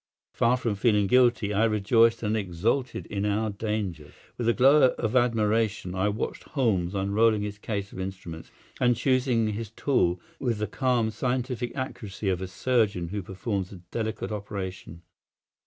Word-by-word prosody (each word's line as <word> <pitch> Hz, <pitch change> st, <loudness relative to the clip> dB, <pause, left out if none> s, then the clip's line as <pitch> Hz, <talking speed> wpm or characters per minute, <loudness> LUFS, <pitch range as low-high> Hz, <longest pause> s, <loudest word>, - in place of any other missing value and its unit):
Far 120 Hz, +2 st, +3 dB
from 115 Hz, -3 st, -1 dB
feeling 105 Hz, 0 st, +2 dB
guilty, 120 Hz, -2 st, +3 dB
I 105 Hz, +3 st, +2 dB
rejoiced 115 Hz, +2 st, +3 dB
and 105 Hz, +1 st, 0 dB
exulted 105 Hz, +7 st, -1 dB
in 100 Hz, -1 st, -3 dB
our 105 Hz, +1 st, 0 dB
dangers. 100 Hz, -7 st, -4 dB, 0.2 s
With 120 Hz, -1 st, 0 dB
a -, -, +4 dB
glow 130 Hz, +1 st, +5 dB
of 110 Hz, +2 st, -2 dB
admiration 110 Hz, -5 st, +1 dB
I 95 Hz, +2 st, +1 dB
watched 105 Hz, +2 st, -3 dB
Holmes 100 Hz, -, 0 dB
unrolling 105 Hz, +2 st, +2 dB
his 100 Hz, 0 st, -5 dB
case 100 Hz, -2 st, -4 dB
of -, -, -8 dB
instruments 95 Hz, -4 st, -7 dB, 0.3 s
and 125 Hz, -1 st, +3 dB
choosing 125 Hz, -3 st, +1 dB
his 105 Hz, 0 st, -4 dB
tool 105 Hz, -7 st, +1 dB, 0.2 s
with 120 Hz, -5 st, -1 dB
the 105 Hz, -, -1 dB
calm, 120 Hz, -3 st, 0 dB
scientific 125 Hz, +1 st, -2 dB
accuracy 110 Hz, -7 st, -4 dB
of 95 Hz, -1 st, -1 dB
a 95 Hz, -, -3 dB
surgeon 100 Hz, -4 st, 0 dB
who 100 Hz, +2 st, -3 dB
performs 95 Hz, +1 st, -4 dB
a -, -, -9 dB, 0.2 s
delicate 110 Hz, -1 st, -3 dB
operation. 95 Hz, -5 st, -6 dB
110 Hz, 155 wpm, -27 LUFS, 100-120 Hz, 0.3 s, glow